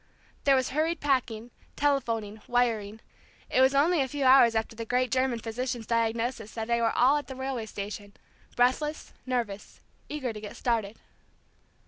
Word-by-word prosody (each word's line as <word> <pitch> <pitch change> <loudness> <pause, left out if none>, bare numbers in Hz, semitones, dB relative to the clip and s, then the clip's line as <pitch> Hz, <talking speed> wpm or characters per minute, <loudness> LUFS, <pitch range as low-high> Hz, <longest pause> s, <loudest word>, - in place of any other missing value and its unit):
There 275 -1 +6
was 260 -1 +1
hurried 320 +4 0
packing, 245 -5 -1 0.2
telephoning, 230 -7 -1
wiring; 225 -3 0 0.5
it 260 - +3
was 265 +1 +4
only 315 +3 +4
a 265 - 0
few 285 +1 -3
hours 255 -3 +7
after 220 0 -1
the 230 - -5
great 250 +1 0
German 255 -1 +1
physician's 235 +1 -4
diagnosis 230 0 -1
that 220 -1 -3
they 235 0 +1
were 230 -1 +1
all 265 +4 +5
at 290 - -5
the 265 - -7
railway 260 -4 -4
station, 205 0 -7 0.4
breathless, 260 +5 0
nervous, 230 -6 -3 0.3
eager 265 -6 -3
to 210 - -8
get 210 - -8
started. 225 -3 -1
245 Hz, 160 wpm, -28 LUFS, 225-265 Hz, 0.5 s, hours